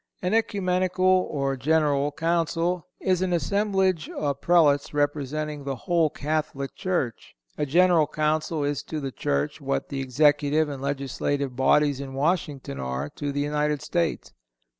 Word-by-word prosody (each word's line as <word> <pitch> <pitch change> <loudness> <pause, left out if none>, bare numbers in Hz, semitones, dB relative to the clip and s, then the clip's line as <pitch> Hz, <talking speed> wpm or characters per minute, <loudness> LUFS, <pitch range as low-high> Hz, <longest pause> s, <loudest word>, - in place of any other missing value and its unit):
An 180 +3 0
Ecumenical 185 -4 +1 0.2
or 140 -2 -1
General 145 0 +1
Council 165 +2 0
is 185 -1 +1
an 185 -1 0
assemblage 190 0 +1
of 140 -2 -3
Prelates 150 -5 +3
representing 145 0 -1
the 140 -1 -3
whole 165 +5 +1
Catholic 145 -2 -3
Church. 175 -11 -3 0.2
A 150 - -2
General 170 0 +4
Council 155 0 0
is 145 -1 -1
to 155 - -5
the 135 -2 -4
Church 70 - -2
what 70 - -2
the 135 -1 -3
Executive 145 +3 +2
and 140 -2 -6
Legislative 140 -1 -2
bodies 140 +2 +3
in 135 -1 -7
Washington 145 - -1
are 65 +2 -3
to 145 - -4
the 145 0 -1
United 150 0 0
States. 170 -2 -2
150 Hz, 140 wpm, -25 LUFS, 140-170 Hz, 0.2 s, General